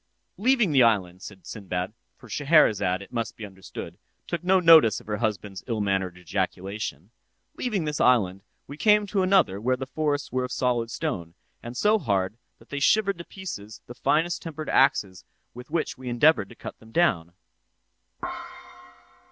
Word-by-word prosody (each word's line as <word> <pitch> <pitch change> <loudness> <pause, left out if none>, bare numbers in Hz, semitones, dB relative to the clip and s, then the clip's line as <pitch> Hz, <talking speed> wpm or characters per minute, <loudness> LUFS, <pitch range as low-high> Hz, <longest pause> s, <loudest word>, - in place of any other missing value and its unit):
"'Leaving 240 -4 +3
this 135 -3 +5
island,' 95 -6 +2
said 95 -2 -11
Sinbad—(for 100 +5 -7
Scheherazade, 110 - +3
it 100 - -16
must 115 -2 -3
be 110 - -6
understood, 95 -1 -9 0.3
took 170 0 -4
no 185 +1 +4
notice 160 - +7
of - - -18
her 105 0 -3
husband's 105 -4 -3
ill 115 -3 -2
mannered 95 -3 -1
ejaculation) 95 0 -4 0.4
'leaving 210 -9 -2
this 150 -1 -2
island, 100 -7 +3 0.2
we 145 - -10
came 210 +3 +4
to 200 -1 0
another 185 - +3
where 130 +3 +1
the 130 - -4
forests 145 0 -2
were 130 0 0
of 125 - -5
solid 120 -3 0
stone, 85 -7 -4 0.3
and 120 +1 -8
so 215 +1 +3
hard 100 - -1 0.2
that - - -21
they 145 - -4
shivered 200 +4 +2
to - - -6
pieces 110 - -8
the 120 - -9
finest 165 +7 0
tempered 155 -2 -6
axes 100 -9 +2 0.3
with 125 +1 -11
which 155 -4 -2
we 130 -1 -6
endeavoured 120 -4 +3
to 120 - -13
cut - - -9
them 110 0 -17
down. 95 - +1
120 Hz, 165 wpm, -26 LUFS, 100-155 Hz, 0.4 s, notice